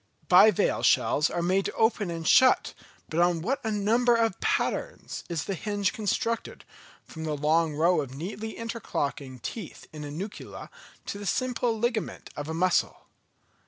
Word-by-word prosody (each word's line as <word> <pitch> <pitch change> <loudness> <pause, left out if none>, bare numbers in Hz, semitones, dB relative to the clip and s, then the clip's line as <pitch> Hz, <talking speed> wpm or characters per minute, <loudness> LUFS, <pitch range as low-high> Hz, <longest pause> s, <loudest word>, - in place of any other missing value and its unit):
Bivalve 215 -4 +5
shells 150 - +3
are 170 - -2
made 190 +2 +1
to - - -3
open 220 -4 +1
and 165 -1 -4
shut, 260 0 +5 0.3
but 160 - -2
on 175 -2 +2
what 270 +6 -1
a 220 - -1
number 225 +4 +2
of 225 -4 +1
patterns - - -2
is 165 -4 -2
the 195 - -3
hinge 205 +1 -1
constructed, 230 +1 -2 0.4
from 160 - -8
the 155 -2 -2
long 155 +1 +2
row 165 +2 +3
of 135 -2 -7
neatly 210 +8 -6
interlocking 145 - -4
teeth 185 - -7
in 150 -1 -7
a 145 - -6
Nucula 190 +8 -7 0.3
to 200 - -5
the 205 - -6
simple 245 +1 0
ligament 235 -1 -2
of 145 +1 -5
a - - -2
Mussel! 180 +1 +1
195 Hz, 160 wpm, -27 LUFS, 160-225 Hz, 0.4 s, Bivalve